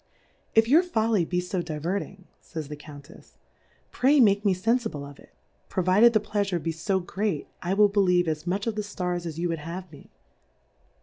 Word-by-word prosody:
If 225 0 +5
your 300 +8 +6
Folly 225 - +1
be 180 +2 -1
fo 180 0 -2
div^erting, 175 +4 -4 0.2
pn's 155 -3 -7
the 150 - -5
Countefs^ 145 +1 -14 0.6
Pray 280 +3 +3
make 205 -4 +4
me 200 -3 +3
fenfible 220 - -1
of 140 0 -13
it; - - -18 0.4
provided 190 +6 +4
the 215 - +4
Pleafure 205 -3 -1
be 165 0 -3
fo 190 +4 -1
great, 190 -2 -3
I 185 +2 -1
will 210 0 +6
believe 180 -4 +2
as 155 +1 -3
much 195 +3 -1
of 230 - -1
the 210 - -2
Stars 180 -4 -3
as 160 -1 -6
you 175 +1 -1
v/ould 165 -1 -2
have 170 +3 -7
me. 145 - -15
185 Hz, 185 wpm, -26 LUFS, 165-210 Hz, 0.6 s, your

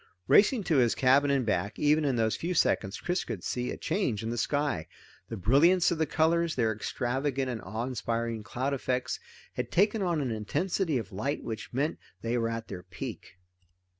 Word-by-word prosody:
Racing 215 +2 +5
to 160 -5 +2
his 120 -3 +3
cabin 135 +2 +4
and 135 -3 +2
back, 100 -1 -1
even 150 +1 +3
in 135 -3 +1
those 110 -1 +1
few 175 +2 -3
seconds 100 -9 +1
Chris 180 +1 -1
could 105 -7 -6
see 125 0 -2
a - - -4
change 155 - -1
in 115 - -2
the - - -2
sky. 145 - 0 0.4
The 115 - -4
brilliance 155 - +4
of 170 - -1
the 160 - +2
colors, 165 +2 +2
their 115 -3 +1
extravagant 130 +4 -2
and 115 - -5
awe 110 +5 -4
inspiring 115 -2 -2
cloud 130 +5 -2
effects, 125 -1 -1 0.3
had 125 -1 -3
taken 205 +3 +2
on 175 -4 +1
an 135 -4 -1
intensity 160 - -1
of 110 -5 -5
light 135 +10 -2
which 110 -1 -6
meant 140 +6 -1 0.2
they 115 +1 0
were 115 -1 +1
at 115 0 -4
their 90 -2 -7
peak. 85 - -8
130 Hz, 195 wpm, -29 LUFS, 115-155 Hz, 0.4 s, Racing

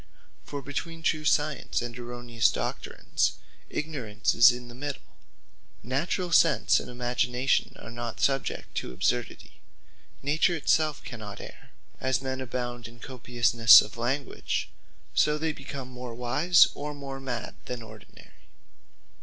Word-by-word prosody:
For 140 -1 -6
between 165 +4 -5
true 155 -1 +1
Science, 145 -2 +1
and 120 -1 -5
erroneous 120 -2 0
Doctrines, - - -1 0.4
Ignorance 130 -9 -2
is 120 +2 +8
in 125 0 -7
the 120 - -11
middle. 140 +2 -5 0.8
Naturall 170 +8 -1
sense 165 -3 +5
and - - -8
imagination, 125 +1 0
are - - -10
not 120 -1 -5
subject 135 -1 0
to - - -3
absurdity. 120 - -2 0.6
Nature 155 +5 +2
it 160 - -4
selfe 155 -2 +2
cannot 110 -5 -8
erre: - - -11 0.3
and 130 - -1
as 130 - +2
men 130 0 -4
abound 120 -2 -4
in 120 +1 -15
copiousnesse 120 -2 +6
of 105 - -3
language; 125 +4 -2 0.4
so 150 0 +3
they 160 +1 -1
become 135 -2 -7
more 125 -2 -7
wise, 150 +9 +5
or 150 0 -5
more 135 -1 -7
mad 130 -3 -4
than 125 -2 -5
ordinary. 110 -1 -16
125 Hz, 135 wpm, -28 LUFS, 120-145 Hz, 0.8 s, is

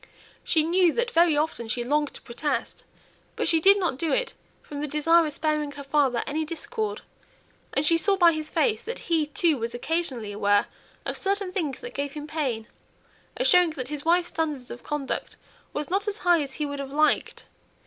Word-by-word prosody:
She 315 -2 +2
knew 350 +1 +3
that 475 0 0
very 335 -4 +4
often 300 -6 -1
she 240 +2 -1
longed 295 +3 0
to - - -10
protest, 260 0 -3 0.5
but - - -1
did 385 +5 +6
not 350 -9 -1
do 325 0 0
it, - - 0 0.3
from 290 -1 -7
the 300 - -2
desire 320 +3 +3
of 300 - -5
sparing 305 -1 -1
her 285 - -8
father 275 -4 +1
any 310 +2 -1
discord; 420 +7 -4 0.7
and 280 - +2
she 330 +2 +4
saw 400 +3 +3
by 345 -2 +6
his 310 -1 -4
face 450 -3 +1
that 475 - -5 0.2
he, 310 -2 +2
too, 305 -1 +1
was 230 +1 -3
occasionally 255 -6 -2
aware 205 0 +2 0.4
of - - -2
certain 395 -1 -1
things 320 -8 -3
that 480 - -7
gave 280 0 -3
him 295 -1 -6
pain, 275 -8 -2 0.7
as - - +3
showing 360 -2 +6
that 255 -1 -4
his 295 -1 -5
wife's 345 +1 +3
standard 300 -6 -3
of 240 - -8
conduct 295 -2 -4 0.4
was 295 +2 -4
not 400 +3 0
as 415 0 -1
high 345 -2 +5
as 275 -2 -5
he 300 - -2
would 285 -1 -5
have 275 -1 -5
liked. 305 +2 +1
305 Hz, 200 wpm, -26 LUFS, 280-345 Hz, 0.7 s, did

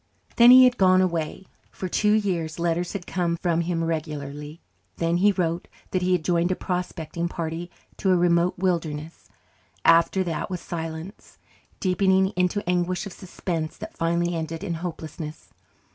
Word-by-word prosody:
Then 235 0 +8
he 255 +1 +10
had 250 -1 +4
gone 185 -1 +5
away. 170 0 -1 0.2
For 185 - -5
two 210 +3 +2
years 180 -7 0
letters 170 +1 -1
had 195 -4 -5
come 170 -2 -1
from 170 -1 0
him 170 -1 -1
regularly. 150 -1 -4 0.4
Then 165 +1 +1
he 205 +3 +4
wrote 175 -3 -1 0.2
that 185 - 0
he 185 0 +2
had 170 -4 0
joined 175 0 +2
a - - +1
prospecting 170 -2 -3
party 170 0 -4 0.3
to 190 - 0
a 185 - +5
remote 175 0 +2
wilderness. 165 -4 -2 0.6
After 170 +3 +5
that 165 -1 -3
was 180 -2 -3
silence, 165 +3 -7 0.4
deepening 190 0 +3
into 180 0 -1
anguish 180 +2 0
of 195 - -7
suspense 170 -3 -4
that - - -9
finally 170 +1 0
ended 160 +1 -4
in 185 -4 -2
hopelessness. 160 -2 -7
175 Hz, 160 wpm, -25 LUFS, 165-185 Hz, 0.6 s, he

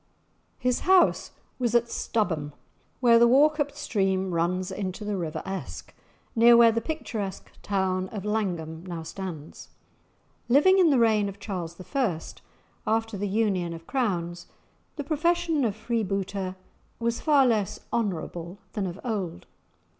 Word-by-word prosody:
His 250 -1 0
house 375 -1 +4 0.3
was 240 -2 0
at 240 0 +4
Stubholm, 160 -12 -2 0.5
where 235 -2 +6
the 235 - +7
Wauchope 290 +3 +4
stream 190 -9 -1
runs 180 +3 0
into 190 +1 -4
the 210 -1 -1
river 165 -4 -4
Esk, 190 0 -6 0.4
near 235 +1 +7
where 235 -1 +7
the 230 +1 -1
picturesque 225 - -5
town 190 -2 -1
of 205 -2 -6
Langholm 175 -7 -2
now 170 -2 -5
stands. 160 -3 -8 0.8
Living 340 +10 +6
in 350 -3 +6
the 280 - +4
reign 215 -3 +3
of 200 +1 -10
Charles 175 -5 -5 0.2
I., 220 -13 +1 0.7
after 225 0 0
the 200 +1 -2
union 195 -5 0
of 165 0 -11
crowns, 175 -9 -2 0.5
the 290 - -4
profession 330 +1 +1
of 215 -4 0
freebooter 200 -4 -2 0.4
was 235 0 -1
far 290 -4 +5
less 215 -5 0
honourable 175 -4 -3 0.2
than 200 -3 -2
of 180 +2 -7
old. 200 - -3
210 Hz, 140 wpm, -26 LUFS, 185-240 Hz, 0.8 s, the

